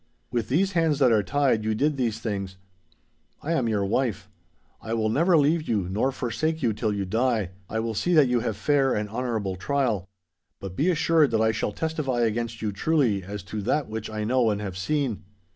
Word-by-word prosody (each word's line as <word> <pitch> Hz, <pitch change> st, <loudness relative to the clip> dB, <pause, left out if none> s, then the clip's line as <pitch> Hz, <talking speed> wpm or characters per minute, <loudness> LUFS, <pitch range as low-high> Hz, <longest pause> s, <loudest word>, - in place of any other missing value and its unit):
With 120 Hz, -3 st, -2 dB
these 185 Hz, +9 st, +2 dB
hands 165 Hz, -5 st, +2 dB
that 130 Hz, -4 st, +4 dB
are 110 Hz, -2 st, +4 dB
tied, 130 Hz, 0 st, +1 dB
you 110 Hz, 0 st, 0 dB
did 145 Hz, +6 st, +1 dB
these 120 Hz, -5 st, -1 dB
things. 100 Hz, -4 st, -4 dB, 0.9 s
I 160 Hz, -, -2 dB
am 130 Hz, -8 st, +1 dB
your 105 Hz, -2 st, 0 dB
wife. 105 Hz, -2 st, -1 dB, 0.5 s
I 115 Hz, -, -3 dB
will 110 Hz, -1 st, 0 dB
never 165 Hz, +9 st, +3 dB
leave 155 Hz, +2 st, +2 dB
you 100 Hz, -6 st, 0 dB
nor 105 Hz, +8 st, 0 dB
forsake 135 Hz, +6 st, -2 dB
you 115 Hz, -3 st, +2 dB
till 110 Hz, +1 st, -1 dB
you 100 Hz, -1 st, -2 dB
die. 110 Hz, -1 st, 0 dB, 0.2 s
I 110 Hz, -, -1 dB
will 115 Hz, 0 st, -2 dB
see 175 Hz, +11 st, +1 dB
that 150 Hz, -4 st, +6 dB
you 125 Hz, -1 st, +2 dB
have 110 Hz, -2 st, -3 dB
fair 135 Hz, +2 st, +2 dB
and 105 Hz, 0 st, -1 dB
honourable 110 Hz, -4 st, -2 dB
trial; 115 Hz, -5 st, -1 dB, 0.5 s
but 95 Hz, -2 st, -7 dB
be 155 Hz, -, +2 dB
assured 165 Hz, -3 st, +3 dB
that 110 Hz, -1 st, +1 dB
I 110 Hz, 0 st, +3 dB
shall 110 Hz, -1 st, -2 dB
testify 150 Hz, -2 st, -2 dB
against 115 Hz, 0 st, -1 dB
you 105 Hz, -, 0 dB
truly 115 Hz, -2 st, +1 dB
as 100 Hz, +1 st, -6 dB
to 105 Hz, +2 st, -5 dB
that 135 Hz, +6 st, 0 dB
which 110 Hz, 0 st, -5 dB
I 110 Hz, 0 st, -3 dB
know 120 Hz, +1 st, +2 dB
and 105 Hz, -1 st, -1 dB
have 100 Hz, -3 st, -5 dB
seen. 125 Hz, +3 st, -1 dB
115 Hz, 210 wpm, -25 LUFS, 105-140 Hz, 0.9 s, that